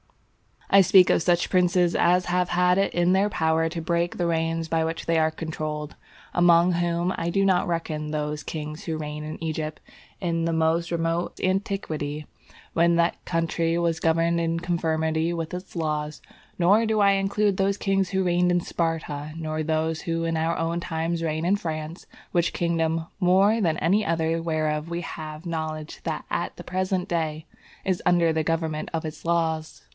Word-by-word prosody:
I 195 - +9
speak 185 0 +6
of - - +3
such 175 0 +2
princes 180 -1 +3
as 180 +1 +3
have 180 0 +1
had 180 +1 +3
it 195 - +1
in 175 +1 +2
their 195 +2 +3
power 160 -3 +1
to 165 0 -5
break 170 +1 -1
the 175 - 0
reins 165 -1 -1
by 160 0 +1
which 165 0 -4
they 165 -1 +2
are 160 0 +3
controlled, 155 -2 -5 0.4
among 175 0 +5
whom 175 +1 0
I 170 - -1
do 195 +3 +2
not 185 -2 +2
reckon 155 -3 -2
those 150 -1 -2
kings 155 +1 -6
who 160 -2 -2
reigned 150 0 -5
in 155 +2 -7
Egypt 155 -1 -3 0.4
in 165 -2 0
the 165 - 0
most 165 +1 +1
remote 165 0 -1
antiquity 160 -6 -2 0.5
when 170 +1 +3
that 170 0 +1
country 165 0 0
was 170 -1 0
governed 165 +1 +2
in 165 0 -1
conformity 160 -1 0
with 165 0 -4
its 180 +1 -7
laws; 150 -2 -2 0.4
nor 200 +6 +4
do 220 -1 +1
I 200 0 +6
include 195 0 +1
those 195 +1 +1
kings 195 -2 0
who 190 0 0
reigned 180 0 +2
in 175 0 +2
Sparta, 155 -3 -3
nor 155 -1 -3
those 160 0 -1
who 165 0 -1
in 165 -1 0
our 165 +1 0
own 165 +1 -1
times 165 0 -2
reign 160 0 -1
in 195 +3 +3
France, 155 -2 -5 0.2
which 175 -1 +1
kingdom, 165 -1 0
more 195 +4 +4
than 165 -6 +1
any 195 +7 +2
other 165 0 0
whereof 155 -1 -1
we 170 0 -3
have 155 -1 -7
knowledge 155 -2 -4 0.3
at - - -2
the - - -9
present 185 0 -2
day, 160 -2 -2 0.4
is 185 -2 -1
under 170 -2 +4
the 160 0 0
government 160 -1 -2
of 165 - -1
its 155 0 -7
laws. 160 -2 -1
165 Hz, 180 wpm, -25 LUFS, 160-175 Hz, 0.5 s, I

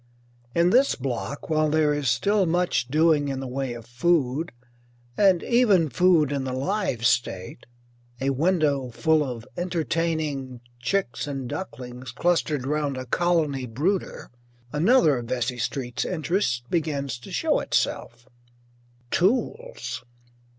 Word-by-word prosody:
In 170 +1 +4
this 265 +5 +4
block, 135 +2 -4
while 155 -1 +2
there 150 -1 +3
is 145 -3 0
still 200 - +2
much 175 -7 +1
doing 155 +1 +3
in 135 -1 -3
the 135 - -5
way 130 -1 -3
of 115 -1 -10
food 140 +4 0 0.6
and 190 -4 +4
even 210 -10 +3
food 160 +1 +3
in 140 -2 -1
the 130 -1 -3
live 135 - -1
state, 120 -4 -1 0.5
a 135 +1 +1
window 145 -3 +1
full 155 +5 +2
of 120 -4 -6
entertaining 160 -6 -2 0.2
chicks 125 -2 -1
and 135 -3 -4
ducklings 125 -5 -7
clustered 155 -2 0
round 145 -1 -1
a 130 - -5
colony 150 -3 +1
brooder 160 - -2 0.4
another 160 - +4
of 120 - -7
Vesey 125 0 -2
Street's 125 0 -2
interests 165 -7 -1
begins 140 -7 -1
to 120 - -11
show - - +1
itself. 120 +2 -2 0.8
Tools. 345 - -1
145 Hz, 130 wpm, -25 LUFS, 125-175 Hz, 0.8 s, In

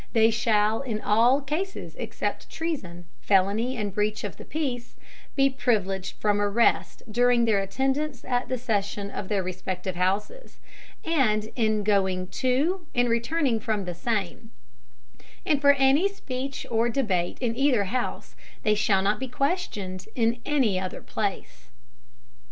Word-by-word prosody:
They 225 0 +5
shall 215 -1 +2
in 230 -6 -3
all 235 +7 +4
Cases, 315 +8 -4
except - - -4
Treason, 185 - -4
Felony 205 +6 +2
and 205 -3 -3
Breach 210 +1 -1
of 205 - -5
the - - -9
Peace, 255 -6 -3 0.4
be 275 -1 +5
privileged 205 -8 -1
from 205 -1 +1
Arrest 205 +3 +2
during 240 +1 +4
their 215 -3 +3
Attendance 270 +8 -1
at 245 -1 -1
the 255 - 0
Session 205 -4 -2
of 195 - -5
their 200 -2 0
respective 185 0 -4
Houses, 200 - -2 0.5
and 220 -10 +1
in 215 -3 +1
going 190 -3 +1
to 310 +8 0
and 245 0 +3
returning 235 +1 +1
from 215 -4 -2
the 180 - -4
same; 210 +3 -3 1.0
and 300 -6 +2
for 285 -1 +7
any 275 +7 +4
Speech 270 -8 -5
or 230 +1 +2
Debate 200 -9 0
in 235 -3 -1
either 260 -5 +3
House, 240 +6 -3 0.3
they 215 - +3
shall 200 -2 +2
not 205 +2 +1
be 265 - -3
questioned 245 - -2
in 235 0 +1
any 255 -11 +2
other 185 -1 -5
Place. 195 - -4
225 Hz, 145 wpm, -26 LUFS, 200-265 Hz, 1.0 s, for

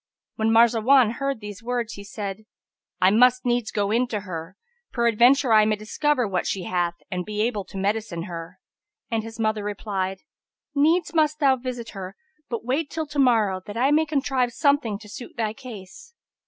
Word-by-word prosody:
When 220 0 +1
Marzawan 235 +1 +5
heard 275 -4 -2
these 205 -1 -8
words 240 -1 -2
he 200 - -9
said, 200 0 -6 0.5
"I 185 +1 +5
must 250 +3 +4
needs 240 -2 +1
go 205 -2 -1
in 240 +3 +2
to 215 -4 -3
her; 180 -1 -7 0.3
peradventure 235 +2 +4
I 215 -1 +7
may 215 0 +2
discover 250 +4 0
what 190 -2 -1
she 190 - -2
hath, 175 -1 -1 0.2
and 180 -1 -2
be 210 +2 -2
able 215 -4 -1
to 195 - -10
medicine 200 -3 -2
her;" 165 -2 -8 0.5
and 225 -1 +1
his 225 +1 -10
mother 215 -1 0
replied, 195 -2 -3 0.5
"Needs 310 +4 +2
must 305 -2 +2
thou 275 -3 +4
visit 245 -2 -6
her, 190 -1 -7 0.3
but 230 -1 -4
wait 280 +5 -1
till 320 -1 -3
to 295 -1 -5
morrow, 220 -8 +3
that 205 +2 -6
I 265 +4 +3
may 310 +1 +3
contrive 265 -4 0
some 285 0 +3
thing 220 -7 -4
to 210 - -12
suit 240 +4 -10
thy 220 -2 -1
case." 250 - -11
225 Hz, 185 wpm, -24 LUFS, 205-255 Hz, 0.5 s, I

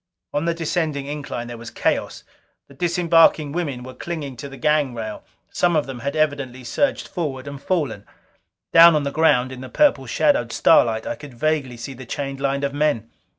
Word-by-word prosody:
On 145 +3 0
the 170 0 0
descending 160 -4 -2
incline 140 -4 -5
there 120 -1 -8
was 115 0 -8
chaos. - - -1 0.4
The 140 - -16
disembarking 165 -1 +3
women 145 -7 -3
were 130 +1 -9
clinging 145 -1 -5
to 140 +4 -7
the 135 - -10
gang 150 -4 +1
rail; 110 -2 -6 0.3
some 175 -1 +2
of 150 - +2
them 135 -2 -7
had 140 +3 -3
evidently 140 -5 -1
surged 200 - 0
forward 145 -6 -4
and 140 -1 -7
fallen. 150 - -2 0.7
Down 165 0 +9
on 150 - +1
the 140 - -2
ground 140 -5 +3
in 130 -1 -8
the 130 - -8
purple 280 - +2
shadowed - - +2
starlight, 110 -1 +4
I - - -2
could 145 -4 -12
vaguely 140 -3 -1
see 115 +4 -7
the 130 -1 -11
chained 135 +1 -4
line 140 0 -1
of 140 0 -1
men. 145 -7 0
140 Hz, 195 wpm, -22 LUFS, 130-155 Hz, 0.7 s, Down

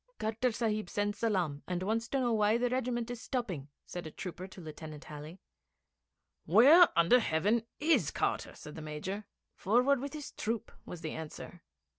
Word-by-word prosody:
'Carter 225 +3 0
Sahib 215 -4 -1
sends 205 0 -1
salaam 180 -10 0
and 180 0 -2
wants 225 +4 0
to 275 - 0
know 240 -2 +1
why 215 +1 +3
the 245 0 0
regiment 245 -2 -1
is 240 -2 -6
stopping,' 195 - -3 0.2
said 175 -2 -6
a - - -8
trooper 180 +2 -6
to 190 - -13
Lieutenant 155 -2 -8
Halley. 150 +3 -9 1.1
'Where 280 - +8
under 170 +9 +6
heaven 215 +5 +1
is 320 +2 +3
Carter?' - - -1
said 150 - -10
the 160 - -8
Major. 155 +7 -5 0.3
'Forward 250 +7 +3
with 280 +3 -5
his 300 -2 -6
troop,' 225 0 -3 0.2
was 175 - -7
the 160 - -4
answer. 160 +2 -8
210 Hz, 170 wpm, -32 LUFS, 170-240 Hz, 1.1 s, Where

